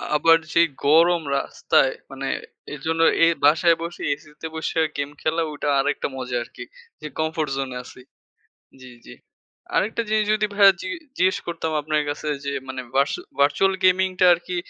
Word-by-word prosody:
আবার 165 +2 +5 0.2
যে - - +4 0.3
গরম 165 +3 +5 0.2
রাস্তায় - - +1 0.2
মানে - - -5 0.5
এরজন্য 160 +3 -2 0.2
এই 170 - +4
বাসায় 165 +3 +5
বসে 170 +1 -6
এসিতে 150 +2 -10
বসে 160 +1 -2 0.2
গেম 145 0 -2
খেলা 160 +1 0
ওটা 145 0 -5
আরেকটা 145 +2 -1
মজা 125 -1 -5
আরকি। 125 - -11 0.4
যে - - -5
কমফোর্ট 155 -1 -1
জোনে 135 -2 -4
আছি। 125 - -14 0.8
জি, 130 - -12 0.2
জি। - - -11 0.6
আরেকটা 225 +3 0
জিনিস 215 0 +2
যদি 215 0 +1
ভাইয়া 200 -1 +7
জি - - -5 0.3
জিজ্ঞেস 185 +1 +3
করতাম 170 -1 -3
আপনার 150 0 0
কাছে 150 +1 -5 0.2
যে 140 - -2 0.2
মানে 130 0 -5
ভার্চু 140 +2 +1 0.2
ভার্চুয়াল 150 +7 +3
গেমিং 185 +1 +4
টা - - +6
আরকি 175 +1 -6
160 Hz, 160 wpm, -23 LUFS, 145-175 Hz, 0.8 s, ভাইয়া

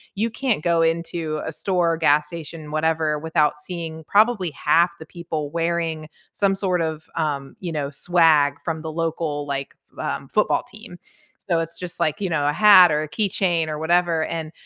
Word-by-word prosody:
you 220 +3 0
can't 230 - -1
go 170 -1 +2
into 165 -1 -1
a 160 - -4
store, 175 -1 0
gas 150 -2 +3
station, 160 -1 -8
whatever, 155 0 0
without 150 -1 +1
seeing 160 -1 -6
probably 210 -3 +2
half 165 +4 +2
the 160 - -9
people 160 -3 -5
wearing 165 -1 -2 0.2
some 195 -1 +1
sort 185 -3 0
of, 160 -1 -3
um, 140 -4 -2
you 175 -3 -4
know, 145 -3 -2
swag 155 -2 +3
from 160 -2 -3
the 160 0 -5
local, 160 -2 -2
like, 140 -1 -4 0.2
v - - -7
um, - - -4
football - - +1
team. - - -11 0.5
So, 170 - +2
it's 165 +1 -5
just 180 -1 -6
like, 155 -3 0
you 190 - -1
know, 150 -3 0
a - - 0
hat 185 -2 +8
or 150 0 +1
a - - -5
keychain 185 -4 0
or 150 -1 -4
whatever, 170 0 +2
and 160 -2 -5
165 Hz, 185 wpm, -22 LUFS, 155-175 Hz, 0.5 s, hat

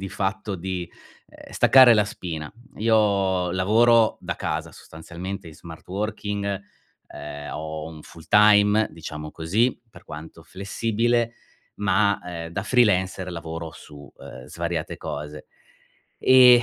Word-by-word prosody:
di 95 - -5
fatto, 100 +2 -3
uhm, 95 - -5
di 90 -1 -4 0.6
staccare 130 -2 +7
la 105 -2 +4
spina. 80 -7 -6 0.3
Io 100 -5 +2
lavoro 110 +5 +4
da - - -4
casa - - -3
sostanzialmente 90 +4 -8
in 80 - -12
smart 80 +1 -12
working, 105 +1 -3 0.6
uhm, 75 0 -8
ho 80 0 -5
un 80 -1 -11
full 80 -1 -14
time 105 0 +5
diciamo 75 -2 -8
così, 105 +10 0
per - - -16
quanto 80 +2 -10
flessibile, 115 +4 -1 0.5
ma, 100 0 +2
uhm, 85 -2 -6
da 95 +4 -3
freelancer 95 -5 +2
lavoro 80 -1 -6
su, 75 -2 -13 0.2
uhm, 65 - -11
svariate 85 +1 -4
cose. 75 -1 -7 0.7
Eh, 125 -2 +7
95 Hz, 125 wpm, -24 LUFS, 80-105 Hz, 0.7 s, staccare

